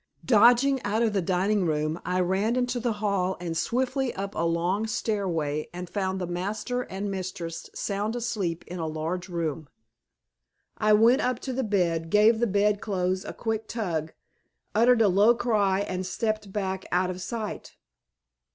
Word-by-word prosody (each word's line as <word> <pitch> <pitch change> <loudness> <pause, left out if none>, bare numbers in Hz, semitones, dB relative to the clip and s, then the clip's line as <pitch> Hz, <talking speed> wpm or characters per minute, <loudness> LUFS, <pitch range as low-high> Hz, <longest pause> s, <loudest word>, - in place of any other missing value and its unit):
Dodging 245 +4 +5
out 220 +3 0
of 220 -3 +1
the 195 - +1
dining 190 +3 +1
room, 155 0 -1
I 180 +1 0
ran 195 +6 +1
into 245 -1 0
the 235 -1 0
hall 200 -3 -1
and 170 -2 -4
swiftly 255 - 0
up 195 +1 -4
a - - -2
long 175 +6 0
stairway 175 -9 -1
and 180 +1 -6
found 190 0 -2
the 180 - -2
master 210 +8 -3
And 200 -3 -4
mistress 180 -3 -5
sound 205 +3 -2
asleep 205 -8 -2
in 180 0 -7
a 160 - -2
large 165 +4 -3
room. 160 -4 -3 1.1
I 215 - +2
went 230 +6 +5
up 250 -1 0
to 260 - -4
the 265 - -1
bed, 175 -7 0
gave 215 +4 +5
the 235 - +2
Bed 205 +1 +2
clothes 185 -2 -1
a - - -6
quick 225 -1 -3
tug, 165 -9 -3 0.6
uttered 235 +1 +5
a - - +5
low 205 +5 +5
cry 205 -5 +1
and 185 -2 -3
stepped 215 +2 -2
back 190 -2 -3
out 180 +1 +2
of 185 0 -7
sight. 220 +1 -5
200 Hz, 170 wpm, -27 LUFS, 180-225 Hz, 1.1 s, Dodging